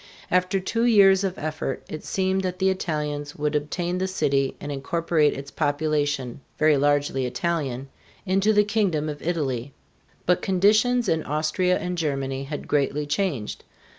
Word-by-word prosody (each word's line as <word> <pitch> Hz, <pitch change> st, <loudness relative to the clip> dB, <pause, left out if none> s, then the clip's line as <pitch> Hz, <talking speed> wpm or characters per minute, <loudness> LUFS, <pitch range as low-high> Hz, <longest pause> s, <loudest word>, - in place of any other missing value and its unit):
After 180 Hz, +2 st, +2 dB
two 230 Hz, +5 st, 0 dB
years 200 Hz, -4 st, +6 dB
of 190 Hz, -1 st, -2 dB
effort 155 Hz, -3 st, -3 dB
it 155 Hz, -, -7 dB
seemed 190 Hz, 0 st, 0 dB
that 185 Hz, -1 st, -3 dB
the 190 Hz, 0 st, +2 dB
Italians 150 Hz, -5 st, -3 dB
would 150 Hz, 0 st, -1 dB
obtain 175 Hz, +5 st, -1 dB
the 190 Hz, -, 0 dB
city 140 Hz, -7 st, 0 dB
and 145 Hz, -, -6 dB
incorporate 155 Hz, +2 st, +1 dB
its 140 Hz, 0 st, -8 dB
population 145 Hz, -3 st, -1 dB, 0.2 s
very 155 Hz, -1 st, +4 dB
largely 145 Hz, -2 st, +1 dB
Italian 140 Hz, -3 st, -2 dB, 0.4 s
into 195 Hz, +3 st, +2 dB
the 210 Hz, -1 st, +5 dB
kingdom 200 Hz, -8 st, 0 dB
of 145 Hz, -1 st, -6 dB
Italy. 140 Hz, -6 st, -2 dB, 0.5 s
But 180 Hz, 0 st, +2 dB
conditions 215 Hz, +6 st, +3 dB
in 160 Hz, -3 st, +1 dB
Austria 155 Hz, +5 st, 0 dB
and 180 Hz, -1 st, -3 dB
Germany 135 Hz, -3 st, -2 dB
had 145 Hz, +1 st, -6 dB
greatly 145 Hz, 0 st, 0 dB
changed. 145 Hz, -, -2 dB
155 Hz, 150 wpm, -24 LUFS, 145-185 Hz, 0.5 s, years